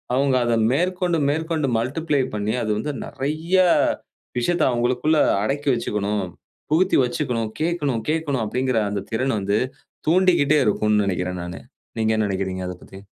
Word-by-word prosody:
அவுங்க 135 0 +2
அத, 120 -1 +2 0.2
மேற்கொண்டு, 180 +2 0
மேற்கொண்டு 160 -1 -1
மல்டிப்ளை 145 +4 0
பண்ணி, 105 +1 -1
அது 110 - -3
வந்து 150 +6 -3
நெறய, 155 +7 -1 0.8
விஷயத்தை 170 +6 +1
அவங்களுக்குள்ள 125 +6 +1 0.3
அடக்கி 140 +5 -1
வச்சுக்கணும். 105 -3 -1 0.5
புகுத்தி 180 +4 +3
வச்சுக்கணும், 120 -3 -2
கேட்கணும் 145 -9 0
கேட்கணும் 150 -6 0
அப்படிங்கிற 125 +2 -1
அந்த 100 -1 -2
திறன 130 +4 0
வந்து, 100 +2 +1 0.5
தூண்டிக்கிட்டே 165 -4 +4
இருக்கும்னு 105 0 +2
நெனைக்கிறேன் 90 -1 -2
நானு. 90 0 -7 0.4
நீங்க 110 0 +2
என்ன 110 - +2
நெனக்கிறீங்க, 95 -1 -3
அதப் 90 - -8
பத்தி? 95 - -12
130 Hz, 135 wpm, -22 LUFS, 105-155 Hz, 0.8 s, தூண்டிக்கிட்டே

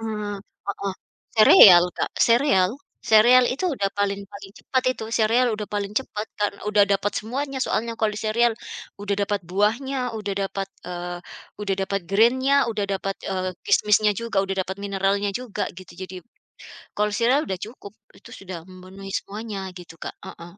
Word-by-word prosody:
Mmm, 210 -2 -4 0.3
Heeh. 200 -1 -3 0.4
Sereal 185 -4 +9
Kak, - - -1
sereal. 230 -6 +3 0.4
Sereal 245 +3 +7
itu 260 +7 -3
udah 205 -9 -1
paling 200 0 0
paling 195 0 -11
cepat 260 -1 -1
itu. 225 - -8
Sereal 230 +3 +3
udah 210 0 -4
paling 205 0 -3
cepat, 215 -3 -3
karena 205 -1 -1
udah 210 -1 +4
dapat 200 0 0
semuanya 270 +5 -3
soalnya 230 -1 -1
kalau 220 -1 +1
di 210 - -6
sereal, 230 +2 +2 0.5
udah 205 0 -1
dapat 205 0 -2
buahnya, 245 +7 0
udah 205 -2 -3
dapat, 195 0 -4 0.2
eee, 175 0 -5 0.4
udah 200 -2 0
dapat 195 +1 -1
grain-nya, 260 +6 +4
udah 215 -3 -1
dapat, 195 0 -2
eee, 185 -1 -2
kismisnya 210 0 +3
juga, 225 -4 0
udah 195 0 -2
dapat 190 - -5
mineralnya 200 0 0
juga 230 +1 -4
gitu, 185 - -13
jadi, 185 0 -7 0.8
kalau 210 0 +1
sereal 250 +7 +2
udah 190 - -2
cukup, 210 -4 -12 0.2
itu - - -16
sudah 180 -4 -8
memenuhi 190 +1 -11
semuanya 205 -2 -5
gitu 175 -2 -12
Kak. - - -6
Heeh. 170 +1 -10
205 Hz, 160 wpm, -23 LUFS, 195-230 Hz, 0.8 s, Sereal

